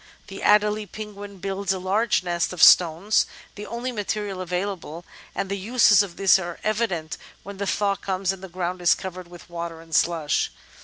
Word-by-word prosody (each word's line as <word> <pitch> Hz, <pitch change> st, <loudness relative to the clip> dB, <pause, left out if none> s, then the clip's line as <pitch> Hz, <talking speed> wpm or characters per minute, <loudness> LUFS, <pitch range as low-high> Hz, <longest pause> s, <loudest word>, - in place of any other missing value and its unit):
The 195 Hz, -, -8 dB
Adelie 210 Hz, 0 st, +2 dB
Penguin 205 Hz, -2 st, -8 dB
builds 195 Hz, 0 st, -2 dB
a 190 Hz, -, 0 dB
large 195 Hz, +3 st, +1 dB
nest 175 Hz, -1 st, -1 dB
of 175 Hz, -, +1 dB
stones, 175 Hz, +5 st, +5 dB, 0.3 s
the 210 Hz, 0 st, -8 dB
only 240 Hz, +2 st, -4 dB
material 205 Hz, -3 st, -3 dB
available, 180 Hz, -2 st, -4 dB, 0.3 s
and 195 Hz, -, -2 dB
the 200 Hz, +1 st, -3 dB
uses 210 Hz, -1 st, +5 dB
of 190 Hz, -4 st, -5 dB
this 195 Hz, -1 st, +5 dB
are 175 Hz, -2 st, -6 dB
evident 205 Hz, -8 st, -2 dB, 0.2 s
when 200 Hz, 0 st, -9 dB
the 200 Hz, 0 st, -3 dB
thaw 200 Hz, 0 st, +1 dB
comes 190 Hz, -1 st, -1 dB
and 190 Hz, -, -11 dB
the 190 Hz, -, -9 dB
ground 180 Hz, +1 st, -4 dB
is 175 Hz, -, +5 dB
covered 185 Hz, -1 st, -7 dB
with 175 Hz, 0 st, -13 dB
water 170 Hz, -1 st, -6 dB
and 165 Hz, 0 st, -14 dB
slush. 160 Hz, -1 st, +1 dB
190 Hz, 185 wpm, -24 LUFS, 175-205 Hz, 0.3 s, stones